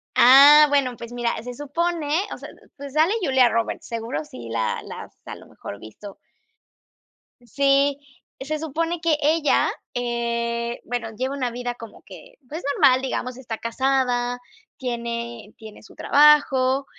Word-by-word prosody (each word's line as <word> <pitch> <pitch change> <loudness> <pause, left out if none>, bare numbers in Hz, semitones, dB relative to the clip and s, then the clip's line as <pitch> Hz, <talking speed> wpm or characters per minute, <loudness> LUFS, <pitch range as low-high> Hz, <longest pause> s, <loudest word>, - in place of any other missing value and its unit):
Ah, 280 +4 +8
bueno 275 -3 +1
pues 235 0 -9
mira, 240 -1 -1
se 245 +2 -7
supone 315 +4 -3 0.3
o - - -7
sea, - - -10 0.3
pues 280 -1 -9
sale 315 +6 +3
Julia 265 -7 +4
Roberts, 230 0 -2
seguro 225 -10 -4
si 120 -5 -10
la 115 -1 -2
la - - -8
has - - -17
a - - -7
lo - - -15
mejor 100 - -10
visto. 195 - -12 1.3
Sí, 275 +3 +2 0.4
se 300 +3 -4
supone 330 +3 -3
que 320 -2 +2
ella, 310 0 +2 0.3
eh, 235 -1 -2
bueno, 235 -1 -4
lleva 260 +5 -3
una 255 -3 -2
vida 245 0 -4
como 230 -2 -13
que, - - -14
pues, 315 +6 -6
normal, 260 -3 +4
digamos, 255 -1 -4
está 235 -4 -6
casada, 245 0 -1 0.4
tiene 235 -3 -5
tiene 220 -2 -12
su - - -17
trabajo, 280 -2 +4
255 Hz, 150 wpm, -23 LUFS, 235-285 Hz, 1.3 s, Ah